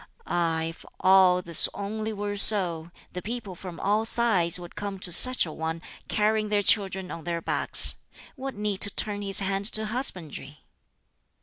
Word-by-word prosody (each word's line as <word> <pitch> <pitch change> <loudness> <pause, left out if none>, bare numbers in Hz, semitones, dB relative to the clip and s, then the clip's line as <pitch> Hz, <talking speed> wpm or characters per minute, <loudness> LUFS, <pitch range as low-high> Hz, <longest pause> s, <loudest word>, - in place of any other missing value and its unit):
Ah, 165 -2 -2
if 165 +1 -8 0.2
all 185 -1 +3
this 170 -2 +6
only 215 +2 -5
were 205 -1 -5
so, 180 -6 +5 0.2
the 180 - -6
people 220 -3 -7
from 180 -1 -11
all 210 +3 0
sides 205 -8 0
would 175 -1 -12
come 200 -1 -6
to 185 -1 -6
such 255 +6 +3
a 160 - -8
one, 160 +1 -5 0.3
carrying 215 0 -1
their 205 -1 0
children 190 -2 +1
on 165 - -9
their 170 0 -4
backs. - - +3 0.4
What 270 -1 -7
need 205 -2 -4
to 205 - +1
turn 205 0 -4
his 195 -1 +2
hand 195 0 -3
to 215 0 -2
husbandry? 180 - -5
195 Hz, 170 wpm, -25 LUFS, 175-210 Hz, 0.4 s, this